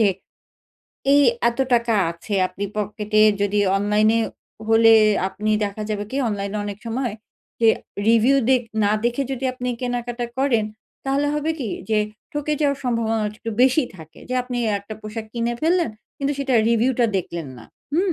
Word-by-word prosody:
যে 215 - +5 1.0
এই 285 - +6 0.3
এত 235 - -4 0.2
টাকা 235 -1 +2 0.2
আছে 170 +5 -6
আপনি 195 +2 -5
পকেটে 210 +1 0 0.2
যদি 205 +1 +1 0.2
অনলাইন 210 +2 +2
এ - - +2 0.5
হলে 225 0 +6 0.4
আপনি 210 +2 -3
দেখা 205 +1 -4
যাবে 205 -1 -2
কি 265 - -3
অনলাইন 200 -1 -3
এ - - -1
অনেক 205 0 -5
সময় 235 -1 -2 0.5
যে 225 - +5 0.4
রিভিউ 230 +4 +5
দে 260 - +6 0.3
না 205 - +3
দেখে 240 +3 +1
যদি 265 0 -4
আপনি 250 0 -4
কেনাকাটা 245 -1 -3
করেন, 255 -5 +2 0.4
তাহলে 275 +2 +1
হবে 300 +2 -1
কি 245 -7 -3 0.2
যে 215 - +3 0.3
ঠকে 295 +1 -1
যাওয়ার 280 -1 +1
সম্ভাবনা 230 -2 0 0.2
একটু 230 0 -5
বেশি 265 +4 +4
থাকে। 160 -1 -14
যে 255 - -2
আপনি 250 -1 -4 0.2
১টা 200 +2 -9
পোশাক 215 +1 -6
কিনে 235 0 -1
ফেললেন 340 -4 +2 0.3
কিন্তু 280 0 0
সেটার 265 -5 +2
রিভিউ 235 +3 +3
টা 235 - +5
দেখলেন 170 -5 -4
না 115 - -12 0.3
হুম। 360 +3 +2
230 Hz, 170 wpm, -22 LUFS, 210-265 Hz, 1.0 s, এই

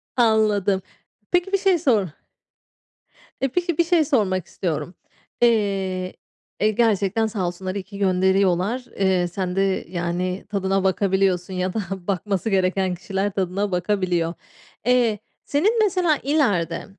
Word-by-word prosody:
Anladım. 215 -5 +2 0.5
Peki 360 +2 +1
bir - - +5
şey 380 -3 +2
sor 225 - +2 1.3
E, 270 - +2
peki 345 +3 -1
bir 340 - +4
şey 335 -2 +3
sormak 190 - +1
istiyorum. 175 0 -3 0.5
Eee, 195 -5 +1 0.5
e, 215 +1 +3
gerçekten 220 -1 +1
sağ 205 -5 -2
olsunlar 185 +2 -5
iyi 200 - -3
ki 200 +1 -11
gönderiyorlar. 190 +4 +2 0.2
Iıı, 185 -2 +2
sen 180 0 -3
de 195 0 0
yani, 180 +1 -2
tadına 195 -1 0
bakabiliyorsun 190 -1 +1
ya 185 0 -2
da 225 - -1 0.3
bakması 200 +2 -1
gereken 190 -1 +1
kişiler 195 +3 -2
tadına 195 +1 -1
bakabiliyor. 180 -2 0 0.5
Eee, 240 -4 +3 0.3
senin 410 +11 +2
mesela 360 -6 +2
ileride 260 - +1
195 Hz, 125 wpm, -22 LUFS, 185-230 Hz, 1.3 s, bir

